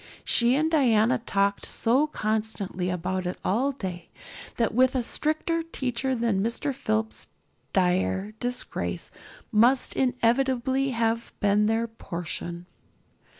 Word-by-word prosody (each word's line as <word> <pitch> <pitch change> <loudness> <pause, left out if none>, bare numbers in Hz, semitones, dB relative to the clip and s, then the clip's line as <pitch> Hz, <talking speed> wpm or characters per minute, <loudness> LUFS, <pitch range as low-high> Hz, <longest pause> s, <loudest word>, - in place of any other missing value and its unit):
She 240 +1 +4
and 315 +3 +1
Diana 240 -6 +3
talked 200 -3 0
so 255 +6 +2
constantly 215 -7 -2
about 180 +1 -2
it 180 - -4
all 250 +9 +2
day 185 -9 -6 0.5
that 230 -2 +1
with 255 +3 +3
a 250 - +1
stricter 310 +6 -1
teacher 265 -5 -2
than 230 -5 +1
Mr. 235 +6 -1
Phillips 220 -3 -2 0.4
dire 190 +2 +1
disgrace 245 0 -2 0.4
must 240 +4 +3
inevitably 260 +1 +1
have 230 -1 -1
been 205 +1 +3
their 225 +1 +1
portion. 175 -4 -6
230 Hz, 115 wpm, -26 LUFS, 200-260 Hz, 0.5 s, She